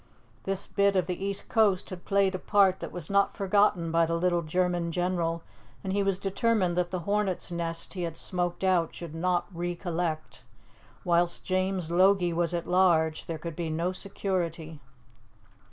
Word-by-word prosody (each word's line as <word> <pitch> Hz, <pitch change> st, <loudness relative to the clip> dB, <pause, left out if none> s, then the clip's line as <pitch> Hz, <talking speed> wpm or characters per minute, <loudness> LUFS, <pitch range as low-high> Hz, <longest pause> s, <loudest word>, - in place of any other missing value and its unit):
This 195 Hz, 0 st, -2 dB
bit 200 Hz, -1 st, +2 dB
of 185 Hz, -3 st, +2 dB
the 180 Hz, +1 st, -4 dB
east 200 Hz, 0 st, -2 dB
coast 205 Hz, -5 st, +2 dB
had 180 Hz, -1 st, -8 dB
played 195 Hz, -1 st, +2 dB
a 185 Hz, -, -3 dB
part 195 Hz, -2 st, +3 dB
that -, -, -6 dB
was 175 Hz, -4 st, -7 dB
not 200 Hz, 0 st, +2 dB
forgotten 195 Hz, -4 st, +2 dB
by 165 Hz, 0 st, +3 dB
the 165 Hz, -, 0 dB
little 175 Hz, 0 st, +1 dB
German 175 Hz, +1 st, 0 dB
general, 170 Hz, -1 st, -1 dB, 0.4 s
and 190 Hz, -, -2 dB
he 200 Hz, -, +2 dB
was 195 Hz, -1 st, +1 dB
determined 195 Hz, -2 st, +1 dB
that 180 Hz, -1 st, 0 dB
the 185 Hz, -1 st, -3 dB
hornet's 200 Hz, -1 st, -1 dB
nest 165 Hz, -1 st, -3 dB
he 185 Hz, -, -4 dB
had 165 Hz, -2 st, -4 dB
smoked 175 Hz, 0 st, -2 dB
out 180 Hz, -3 st, +2 dB
should 170 Hz, -3 st, -8 dB
not 175 Hz, +2 st, 0 dB
re 175 Hz, +1 st, -3 dB
collect. 170 Hz, -3 st, -3 dB, 0.6 s
Whilst 175 Hz, 0 st, +1 dB
James 185 Hz, -2 st, -1 dB
Logie 185 Hz, 0 st, +4 dB
was 170 Hz, 0 st, +1 dB
at 170 Hz, -1 st, -2 dB
large 170 Hz, -4 st, +2 dB
there 165 Hz, -, -3 dB
could 165 Hz, +1 st, -6 dB
be 170 Hz, -1 st, -3 dB
no 165 Hz, +3 st, -1 dB
security. 170 Hz, -5 st, -3 dB
180 Hz, 175 wpm, -28 LUFS, 170-190 Hz, 0.6 s, Logie